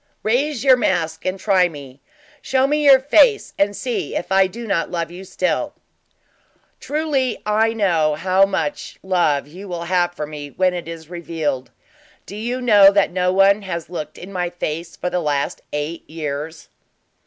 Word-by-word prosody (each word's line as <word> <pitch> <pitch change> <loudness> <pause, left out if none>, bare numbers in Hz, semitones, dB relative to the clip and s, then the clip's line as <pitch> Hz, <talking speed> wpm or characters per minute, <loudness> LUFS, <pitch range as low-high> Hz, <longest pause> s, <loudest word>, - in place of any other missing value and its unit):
"Raise 260 +4 0
your 260 -2 +6
mask 165 -7 -1
and 185 +1 -2
try 185 -3 +3
me! 140 -3 -12 0.4
Show 265 0 +1
me 300 +2 +1
your 270 -2 +8
face 415 - +3
and 200 +1 +1
see 245 -2 -3
if - - -4
I 190 0 +5
do 235 +5 -8
not 195 -6 -1
love 170 -1 -3
you 180 +2 -9
still!" 190 +10 -2 1.0
"Truly 285 -5 -1
I 220 +2 +2
know 170 -8 +1
how 185 +4 +3
much 245 +9 -3
love 175 -7 +1
you 185 +7 -11
will 175 -2 -5
have 175 0 0
for 150 - -4
me 145 -1 -8
when 185 +4 +1
it 175 -2 -5
is 165 0 -9
revealed. 160 -6 -3 0.6
Do 200 - -9
you 240 +4 -3
know 205 -5 +7
that 200 0 +2
no 180 0 +1
one 195 +2 +4
has 170 -3 -6
looked 160 -4 -6
in 190 +3 -10
my 180 -1 -1
face 170 -1 -5
for 180 - -4
the 180 - 0
last 145 -3 -1
eight 150 +3 -5
years." 155 0 -6
185 Hz, 175 wpm, -20 LUFS, 165-215 Hz, 1.0 s, your